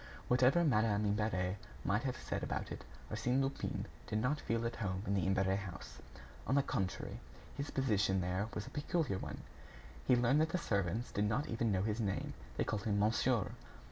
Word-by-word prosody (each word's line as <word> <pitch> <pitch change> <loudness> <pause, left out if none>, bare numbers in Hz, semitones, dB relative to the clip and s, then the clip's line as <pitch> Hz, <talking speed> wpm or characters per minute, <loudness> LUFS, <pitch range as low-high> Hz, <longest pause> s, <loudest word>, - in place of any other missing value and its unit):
Whatever 130 +7 +5
Madame 110 -7 +3
Imbert 100 -3 +1 0.3
might 105 +5 +2
have 130 -1 -1
said - - -3
about - - -3
it, - - -6 0.3
Arsène 125 +2 +1
Lupin 135 0 -1 0.2
did 105 - -1
not 135 +6 +1
feel 115 0 0
at 115 0 -2
home 95 -3 -2
in 100 - 0
the 95 -2 +1
Imbert 95 0 +3
house. 95 -4 -8 0.5
On 130 - +3
the 140 - +5
contrary, 95 -7 -2 0.4
his 140 0 -3
position 105 -7 +2
there 90 +3 0
was 105 - -3
a - - -9
peculiar 145 - 0
one. - - -5 0.7
He - - +7
learned 125 +5 +4
that 160 - +2
the 180 - 0
servants 100 - 0
did 105 - +1
not 125 +9 +1
even 115 -1 +1
know 95 -1 +2
his 110 +1 0
name. 100 -4 -1 0.2
They - - +2
called 105 -2 -2
him 105 -2 +2
"monsieur." 110 +1 +2
110 Hz, 190 wpm, -36 LUFS, 100-125 Hz, 0.7 s, He